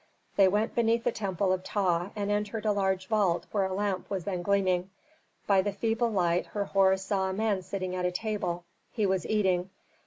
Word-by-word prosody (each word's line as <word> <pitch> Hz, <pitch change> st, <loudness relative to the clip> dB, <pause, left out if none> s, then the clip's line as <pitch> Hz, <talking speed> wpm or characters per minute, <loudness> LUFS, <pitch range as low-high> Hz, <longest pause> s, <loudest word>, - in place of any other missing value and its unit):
They 195 Hz, -1 st, +6 dB
went 210 Hz, +4 st, +1 dB
beneath 230 Hz, 0 st, +2 dB
the -, -, +1 dB
temple 195 Hz, -3 st, 0 dB
of 185 Hz, 0 st, -2 dB
Ptah 180 Hz, -3 st, 0 dB
and 205 Hz, -1 st, -2 dB
entered 210 Hz, +1 st, -2 dB
a 215 Hz, -, +3 dB
large 190 Hz, -2 st, 0 dB
vault 190 Hz, -4 st, +1 dB
where 200 Hz, -2 st, +1 dB
a 190 Hz, -, -2 dB
lamp 200 Hz, -2 st, -2 dB
was 190 Hz, -3 st, -2 dB
then 180 Hz, -1 st, -3 dB
gleaming. 185 Hz, -1 st, +1 dB, 0.6 s
By 195 Hz, -2 st, +4 dB
the 205 Hz, +2 st, -1 dB
feeble 225 Hz, +3 st, 0 dB
light 180 Hz, -4 st, +1 dB
Herhor 195 Hz, -2 st, +2 dB
saw 190 Hz, 0 st, -1 dB
a -, -, -2 dB
man 205 Hz, -1 st, 0 dB
sitting 185 Hz, 0 st, -4 dB
at 180 Hz, -, -2 dB
a 180 Hz, -, +1 dB
table; 180 Hz, -3 st, -2 dB, 0.3 s
he 215 Hz, -4 st, 0 dB
was 190 Hz, -2 st, 0 dB
eating. 190 Hz, -4 st, +1 dB
195 Hz, 195 wpm, -29 LUFS, 185-210 Hz, 0.6 s, They